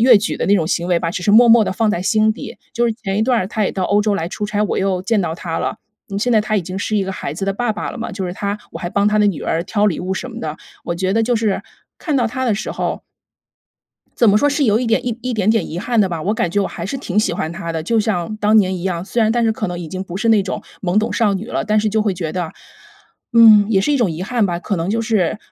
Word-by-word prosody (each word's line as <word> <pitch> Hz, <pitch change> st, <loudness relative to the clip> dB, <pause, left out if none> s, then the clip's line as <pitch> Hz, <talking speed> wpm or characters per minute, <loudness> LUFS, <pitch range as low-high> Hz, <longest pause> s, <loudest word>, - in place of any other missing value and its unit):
越 240 Hz, -4 st, +7 dB
举 215 Hz, -, -2 dB
的 -, -, -2 dB
那 200 Hz, +1 st, +4 dB
种 160 Hz, -, 0 dB
行 175 Hz, 0 st, -1 dB
为 175 Hz, -2 st, +3 dB
吧， 165 Hz, -1 st, -2 dB
只 180 Hz, -, -4 dB
是 205 Hz, -, +2 dB
默 235 Hz, +3 st, +7 dB
默 225 Hz, -1 st, +7 dB
地 -, -, -2 dB
放 220 Hz, +3 st, +1 dB
在 180 Hz, -4 st, 0 dB
心 215 Hz, +2 st, +3 dB
底。 -, -, -9 dB, 0.2 s
就 240 Hz, 0 st, +1 dB
是 230 Hz, -, +2 dB
前 200 Hz, -4 st, -4 dB
一 -, -, +2 dB
段 245 Hz, 0 st, +2 dB
儿 185 Hz, -, -1 dB
他 215 Hz, +1 st, -2 dB
也 -, -, +1 dB
到 190 Hz, -2 st, -2 dB
欧 205 Hz, +2 st, +2 dB
洲 210 Hz, -1 st, +1 dB
来 165 Hz, -, -2 dB
出 210 Hz, +3 st, -4 dB
差， 210 Hz, 0 st, -2 dB
我 -, -, -2 dB
又 190 Hz, -1 st, 0 dB
见 215 Hz, +1 st, +1 dB
到 165 Hz, -2 st, -2 dB
他 165 Hz, -2 st, -4 dB
了， -, -, -2 dB, 0.3 s
嗯， 200 Hz, -, -2 dB
现 245 Hz, +3 st, +1 dB
在 220 Hz, -, +5 dB
他 215 Hz, 0 st, -1 dB
已 190 Hz, -, 0 dB
经 185 Hz, +2 st, -6 dB
是 210 Hz, +2 st, -1 dB
一 195 Hz, -, +1 dB
个 190 Hz, -, -4 dB
孩 140 Hz, -, -5 dB
子 195 Hz, +5 st, -4 dB
的 195 Hz, -, 0 dB
爸 230 Hz, +2 st, -1 dB
爸 -, -, -5 dB
了 -, -, -8 dB
嘛， 230 Hz, -, -4 dB
就 190 Hz, -2 st, -4 dB
是 175 Hz, -, -4 dB
他 200 Hz, +2 st, -3 dB
我 -, -, -6 dB
还 175 Hz, -, -4 dB
帮 200 Hz, +1 st, +1 dB
他 210 Hz, 0 st, +3 dB
的 210 Hz, -, +4 dB
女 190 Hz, -, -3 dB
儿 165 Hz, -, -1 dB
挑 205 Hz, +3 st, 0 dB
礼 185 Hz, -, 0 dB
物 185 Hz, +2 st, -3 dB
什 210 Hz, +6 st, -4 dB
么 235 Hz, -1 st, -8 dB
的。 155 Hz, 0 st, -4 dB, 0.3 s
我 170 Hz, -, -3 dB
觉 185 Hz, +1 st, 0 dB
得 225 Hz, +1 st, +2 dB
就 240 Hz, +2 st, +1 dB
是 215 Hz, -3 st, 0 dB, 0.4 s
看 310 Hz, -, -2 dB
到 245 Hz, -3 st, +2 dB
他 260 Hz, +3 st, -3 dB
的 225 Hz, -4 st, +2 dB
时 215 Hz, -, -4 dB
候 -, -, -3 dB, 1.2 s
怎 235 Hz, -, +5 dB
么 205 Hz, -, +4 dB
说 290 Hz, -, +3 dB
是 285 Hz, 0 st, +1 dB
有 215 Hz, -3 st, +3 dB
一 250 Hz, -, -1 dB
点 225 Hz, +2 st, +1 dB
一 235 Hz, -, -1 dB
一 250 Hz, 0 st, -3 dB
点 210 Hz, -1 st, 0 dB
点 220 Hz, -5 st, +1 dB
遗 165 Hz, -, -4 dB
憾 235 Hz, +3 st, +1 dB
的 195 Hz, -, +3 dB
吧， 165 Hz, -3 st, -4 dB
我 205 Hz, -, 0 dB
感 180 Hz, -, -1 dB
觉 205 Hz, -, 0 dB
我 -, -, -1 dB
还 170 Hz, -, -6 dB
是 275 Hz, -, -3 dB
挺 210 Hz, -6 st, 0 dB
喜 195 Hz, -, 0 dB
欢 160 Hz, -2 st, -3 dB
他 170 Hz, 0 st, -5 dB
的， 160 Hz, -1 st, -3 dB
就 225 Hz, +6 st, +1 dB
像 210 Hz, -2 st, -2 dB
当 215 Hz, +1 st, +3 dB
年 190 Hz, -3 st, +3 dB
一 175 Hz, -, -5 dB
样。 180 Hz, -2 st, -2 dB
虽 230 Hz, +2 st, 0 dB
然 220 Hz, -, +3 dB
但 235 Hz, 0 st, +1 dB
是 225 Hz, -, +2 dB
可 215 Hz, 0 st, -3 dB
能 175 Hz, -1 st, -4 dB
已 175 Hz, -, -6 dB
经 185 Hz, +3 st, -4 dB
不 180 Hz, -2 st, -7 dB
是 225 Hz, +3 st, +1 dB
那 210 Hz, -3 st, +4 dB
种 185 Hz, -, -4 dB, 0.2 s
懵 185 Hz, +2 st, +1 dB
懂 220 Hz, -, 0 dB
少 210 Hz, -4 st, +2 dB
女 195 Hz, +3 st, -4 dB
了， -, -, -2 dB
但 215 Hz, 0 st, +2 dB
是 215 Hz, 0 st, +1 dB
就 220 Hz, +1 st, +1 dB
会 210 Hz, -3 st, 0 dB
觉 165 Hz, -3 st, -4 dB
得， 175 Hz, -3 st, -3 dB, 0.8 s
嗯 220 Hz, -3 st, +8 dB
也 205 Hz, -, +3 dB
是 245 Hz, +10 st, +1 dB
一 -, -, +3 dB
种 215 Hz, -8 st, +2 dB
遗 160 Hz, +3 st, -5 dB
憾 225 Hz, 0 st, +1 dB
吧， 175 Hz, -1 st, -2 dB
可 200 Hz, +2 st, -3 dB
能 165 Hz, +1 st, -2 dB
就 225 Hz, +3 st, 0 dB
是， 215 Hz, -4 st, 0 dB
205 Hz, 345 characters per minute, -18 LUFS, 185-225 Hz, 1.2 s, 嗯